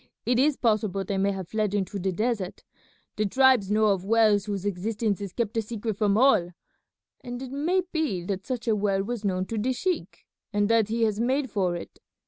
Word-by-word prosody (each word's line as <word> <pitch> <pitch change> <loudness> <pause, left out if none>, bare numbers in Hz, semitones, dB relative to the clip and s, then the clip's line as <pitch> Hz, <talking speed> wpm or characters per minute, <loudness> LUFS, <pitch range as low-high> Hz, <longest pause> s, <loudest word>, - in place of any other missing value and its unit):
It 245 0 +2
is 285 +1 +3
possible 215 -4 +1
they 195 +1 -2
may 195 +1 +2
have 190 -3 -6
fled 215 -2 -1
into 200 0 -2
the 190 +1 -1
desert. 210 -1 -2 0.5
The 215 0 +1
tribes 260 -3 +4
know 215 +1 +3
of 195 -3 +1
wells 210 -1 +3
whose 200 -2 -4
existence 205 +2 -1
is 200 -2 -5
kept 225 +1 -2
a - - +3
secret 220 0 -4
from 205 0 +2
all, 215 -9 +4 0.7
and 245 0 -6
it 260 -1 -7
may 335 +7 +1
be 295 - -1
that 190 +1 -4
such 250 -2 -4
a 220 - +3
well 200 -2 +1
was 230 +1 -4
known 185 -2 0
to 225 +2 -3
the 255 +5 0
sheik 360 +8 -3 0.3
and 205 0 +1
that 225 -2 +3
he 230 +1 0
has 215 -2 +1
made 260 +2 0
for 185 -4 0
it. 170 - -9
215 Hz, 210 wpm, -26 LUFS, 195-240 Hz, 0.7 s, tribes